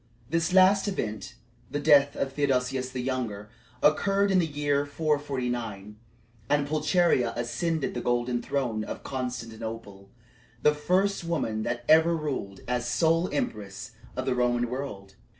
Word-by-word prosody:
This 165 +1 +1
last 190 +2 +5
event 110 - -4 0.3
the 145 - -2
death 145 -1 +5
of 135 -1 -2
Theodosius 130 -2 0
the 130 -1 -4
Younger 115 -5 -3 0.3
occurred 195 +6 +3
in 190 - +4
the 170 - +1
year 145 -1 0
449, 125 -9 -2 0.5
and 145 -1 +2
Pulcheria 155 -5 +2
ascended 150 +7 -1
the 120 - -3
golden 120 0 0
throne 125 -5 -1
of - - -7
Constantinople 115 -6 -6 0.5
the 150 - +5
first 185 +6 +1
woman 150 -10 -1
that 120 +2 -3
ever 160 +2 +5
ruled 130 -11 -4
as 125 0 -1
sole 165 +5 +2
empress 110 -3 -4 0.3
of 130 - -2
the - - +1
Roman 120 -1 +1
world. 105 -8 -6
130 Hz, 135 wpm, -27 LUFS, 120-155 Hz, 0.5 s, last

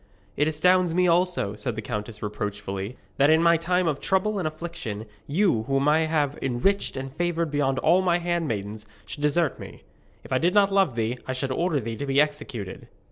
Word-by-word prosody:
'It 150 - +2
astounds 175 +2 +3
me 180 0 +3
also,' 175 - +1
said 120 +1 -4
the 110 - -4
countess 105 +1 -5
reproachfully, 105 +1 -4 0.2
'that 140 +1 +4
in 160 +1 +5
my 170 0 +6
time 180 +2 +1
of 150 -4 0
trouble 195 +2 +1
and 170 - -1
affliction, 155 -10 -6 0.2
you, 160 - +2
whom 135 +1 +1
I 160 +2 +4
have 150 -3 0
enriched 135 +7 0
and 135 0 -5
favoured 170 -2 -1
beyond 140 -2 +1
all 170 +7 +4
my 175 -2 +2
handmaidens, 115 - -3 0.2
should 145 - -8
desert 150 +2 +1
me. - - -10 0.4
If - - -6
I 130 - +3
did 175 +4 +1
not 200 -1 +5
love 195 -10 +2
thee, 115 +2 -1
I 130 - -1
should 130 +1 -2
order 165 +2 0
thee 115 -2 -5
to 140 - -4
be 135 +1 +2
executed.' 145 -10 -2
150 Hz, 195 wpm, -25 LUFS, 120-175 Hz, 0.4 s, my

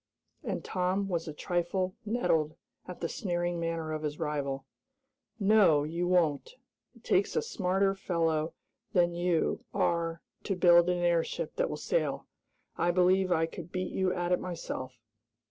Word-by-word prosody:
and - - -3
Tom 185 +2 0
was 170 -3 -2
a - - -3
trifle 175 +4 -1
nettled 165 -9 +1 0.3
at 180 - -8
the 170 - 0
sneering 175 -1 -2
manner 165 -1 -2
of 155 -1 -3
his 150 -1 -3
rival. 140 -3 -2 0.7
"No, 195 -8 +5
you 170 +4 -2
won't! 175 - +1 0.4
It - - -20
takes - - +2
a 460 - +3
smarter 195 - +1
fellow 165 -4 -1 0.4
than 175 -1 +3
you 175 -1 0
are 165 -1 0 0.2
to 195 - 0
build 175 -1 +6
an 180 - +1
airship 175 - 0
that - - +1
will - - -4
sail. - - -1 0.5
I 175 - +2
believe 185 +1 +3
I 165 -2 +3
could 175 0 -9
beat 185 -1 -3
you 190 -1 +1
at 175 0 -2
it 180 - +3
myself." 130 -7 -5
175 Hz, 155 wpm, -30 LUFS, 165-185 Hz, 0.7 s, build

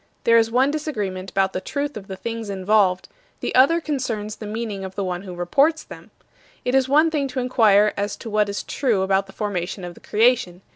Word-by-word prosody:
There 230 0 +5
is 225 0 +1
one 255 +4 +2
disagreement 205 -12 -4
about 190 +1 0
the 185 - -3
truth 285 +7 -3
of 200 -2 -8
the 190 - -6
things 225 +2 -5
involved; 195 -1 +2 0.3
the - - -3
other 280 +7 +5
concerns 240 -9 -3
the 215 - -7
meaning 215 -2 -4
of 190 0 -7
the 200 - -2
one 180 -1 -3
who 185 -2 -8
reports 280 - +2
them. - - -12 0.6
It 250 - 0
is 265 -1 +3
one 310 +3 +4
thing 290 -3 0
to 260 0 -4
inquire 215 -5 +4
as 205 +1 -2
to 225 - -9
what 210 -1 +2
is 200 - -4
true 230 -9 0
about 195 0 +1
the - - -12
formation 195 -3 -3
of 175 0 -6
the - - -16
Creation. 215 -5 +1
210 Hz, 220 wpm, -22 LUFS, 195-255 Hz, 0.6 s, There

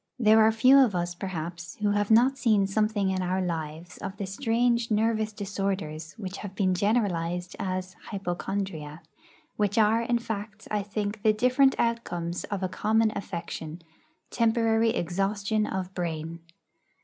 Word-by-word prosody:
There 220 -2 +5
are 220 +1 +6
few 255 +5 +6
of 240 -8 +4
us, 175 0 -1
perhaps, 175 -1 -6
who 210 -1 0
have 205 0 0
not 245 +5 +5
seen 215 -7 +3
something 205 -1 +1
in 185 0 -1
our 185 +1 0
lives 165 -1 -4
of 195 0 -6
the 200 - -3
strange 235 +3 +1
nervous 220 0 +1
disorders 195 -6 -3
which 195 -4 -7
have 195 -2 -8
been 190 -2 +2
generalised 180 -4 0
as 185 -1 -3 0.2
'hypochondria,' 175 -5 -4 0.5
which 205 0 0
are, 220 +1 +4
in 240 +1 +1
fact, 220 -1 -6
I 210 -1 +1
think, 205 +1 -4
the 215 0 +4
different 255 +4 +3
outcomes 180 -8 -1
of 200 -2 -4
a - - +1
common 220 +4 +1
affection 170 -3 -6 0.5
temporary 225 -1 +2
exhaustion 200 +2 0
of 190 -1 -4
brain. 165 -2 -4
200 Hz, 150 wpm, -27 LUFS, 180-220 Hz, 0.5 s, are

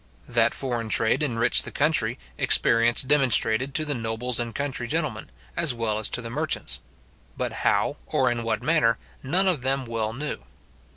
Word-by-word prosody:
That - - +2
foreign 120 -4 -4
trade 110 +6 +1
enriched 120 -5 +3
the - - -4
country, 140 -6 0 0.2
experience 115 +1 +4
demonstrated 130 -2 +2
to 155 - +3
the 150 - 0
nobles 115 0 -1
and 120 -1 -4
country 135 -4 -4
gentlemen, 115 - -2 0.3
as 165 -7 +2
well 110 -2 -2
as 110 - 0
to 125 - -1
the 115 - -5
merchants; 65 - -2 0.6
but - - -3
how, - - 0
or - - 0
in 120 0 -2
what 110 -2 -3
manner, 125 -8 +2 0.2
none 180 +8 +3
of 175 -8 0
them 135 +1 0
well 115 -2 -3
knew. 145 +6 -5
120 Hz, 170 wpm, -24 LUFS, 115-140 Hz, 0.6 s, experience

